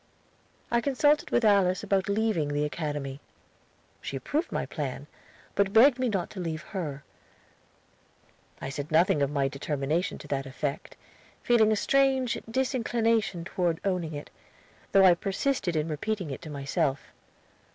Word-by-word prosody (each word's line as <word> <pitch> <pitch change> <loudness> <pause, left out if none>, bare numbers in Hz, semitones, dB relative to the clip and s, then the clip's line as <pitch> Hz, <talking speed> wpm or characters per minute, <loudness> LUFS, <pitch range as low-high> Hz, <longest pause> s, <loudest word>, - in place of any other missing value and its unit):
I 235 0 +3
consulted 290 +3 +2
with 240 - +2
Alice 195 -3 +3
about 195 0 0
leaving 205 -7 +1
the 145 +1 0
Academy. 145 -3 -4 0.8
She 135 - -4
approved 295 - -2
my - - -1
plan, - - -5 0.5
but 200 0 +1
begged 255 +3 +6
me 255 -1 +1
not 190 -5 -2
to 200 - -8
leave 165 -2 -3
her. 150 -8 -5 1.6
I 135 - -5
said 145 +2 -5
nothing 160 -2 +4
of 140 - +2
my 140 -2 +1
determination 145 +4 -2
to - - -11
that 135 -1 -2
effect, 140 +2 -4 0.5
feeling 220 -3 +4
a - - +3
strange 265 +1 +2
disinclination 230 -6 0
toward 175 -3 -1
owning 175 -5 -1
it, 145 - -8 0.6
though 195 -1 +6
I 180 - +8
persisted 195 +1 -1
in 155 0 0
repeating 175 +2 -3
it 135 - -6
to 165 - -9
myself. 140 0 -2
180 Hz, 145 wpm, -28 LUFS, 150-220 Hz, 1.6 s, I